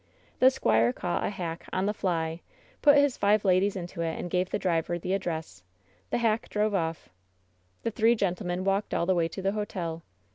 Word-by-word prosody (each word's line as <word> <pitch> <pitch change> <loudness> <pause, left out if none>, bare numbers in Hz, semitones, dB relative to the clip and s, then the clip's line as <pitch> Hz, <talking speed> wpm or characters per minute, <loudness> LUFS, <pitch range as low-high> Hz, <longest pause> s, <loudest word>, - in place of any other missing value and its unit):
The 255 - +7
squire 115 - +2
caught 175 +7 -2
a - - 0
hack 170 -4 -5
"on 185 +1 0
the 210 - 0
fly," 165 -4 -2 0.4
put 290 -1 +7
his 285 -2 +3
five 205 +1 +3
ladies 190 +2 +3
into 175 -2 -5
it 165 -1 -2
and 175 - -5
gave 180 0 +1
the - - -1
driver 175 -3 0
the 180 +2 -3
address. 170 -5 -3 0.5
The - - 0
hack 225 -2 0
drove 210 0 0
off. 165 - -2 0.7
The 230 - -1
three 225 +2 +3
gentlemen 180 -3 -1
walked 195 +2 0
all 170 - +1
the 185 - +3
way 170 -2 +1
to 185 +3 -7
the 195 - +2
hotel. 185 -6 -4
185 Hz, 195 wpm, -28 LUFS, 170-210 Hz, 0.7 s, The